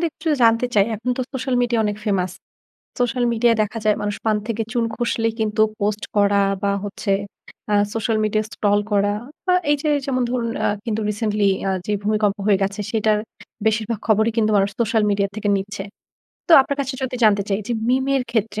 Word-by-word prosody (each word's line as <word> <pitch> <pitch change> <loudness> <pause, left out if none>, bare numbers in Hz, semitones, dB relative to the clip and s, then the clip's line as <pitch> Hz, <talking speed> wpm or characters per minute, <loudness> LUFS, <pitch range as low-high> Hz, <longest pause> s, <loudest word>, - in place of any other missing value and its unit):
দে - - 0
একটু 310 +2 -17 0.2
জানতে 230 +1 +4
চাই। 200 -2 +5
এখন 230 +4 -3
তো 255 - -1
সোশ্যাল 265 -1 -2
মিডিয়া 240 -2 +1
অনেক 205 -1 -1
ফেমাস। 185 -4 0 0.7
সোশ্যাল 245 0 +1
মিডিয়ায় 230 0 +3
দেখা 215 +2 -3
যায় 215 -1 +3
মানুষ 205 0 -2
পান 220 -1 +2
থেকে 230 0 -1
চুন 240 -2 +1
খসলেই 225 -1 -1
কিন্তু 215 0 +1 0.2
পোস্ট 205 +1 -1
করা 200 0 +4 0.2
বা 200 0 +1
হচ্ছে 200 0 -4 0.6
আ - - +4 0.2
সোশ্যাল 225 0 0
মিডিয়া 215 0 +1
scroll 205 -1 +2
করা 205 0 +2 0.3
বা 365 - +4 0.2
এইযে, 295 +1 0 0.2
যেমন 255 -2 0
ধরুন 240 -2 -1 0.2
আ - - +3 0.2
কিন্তু 220 -1 -1
রিসেন্টলি 210 -1 0 0.2
আ - - +1 0.2
যে, 210 - -1
ভূমিকম্প 210 -1 +1
হয়ে 200 -2 +4
গেছে 200 +2 -2
সেটার 215 -1 +2 0.5
বেশিরভাগ 220 0 0
খবরই 220 +1 +3
কিন্তু 215 -1 +2
মানুষ 200 0 +2
সোশ্যাল 225 -1 +2
মিডিয়া 200 0 +1
থেকে 215 -1 -2
নিচ্ছে। 200 +1 -5 0.7
তো - - +5
আপনার 280 +1 -3
কাছে 270 -1 -3
যোদি 260 -1 -2
জানতে 205 -2 +4
চাই 195 +1 +1
যে, - - 0 0.2
মিম 260 +1 +2
এর 270 - +2
ক্ষেত্রে 220 -2 -1
215 Hz, 195 wpm, -21 LUFS, 205-235 Hz, 0.7 s, চাই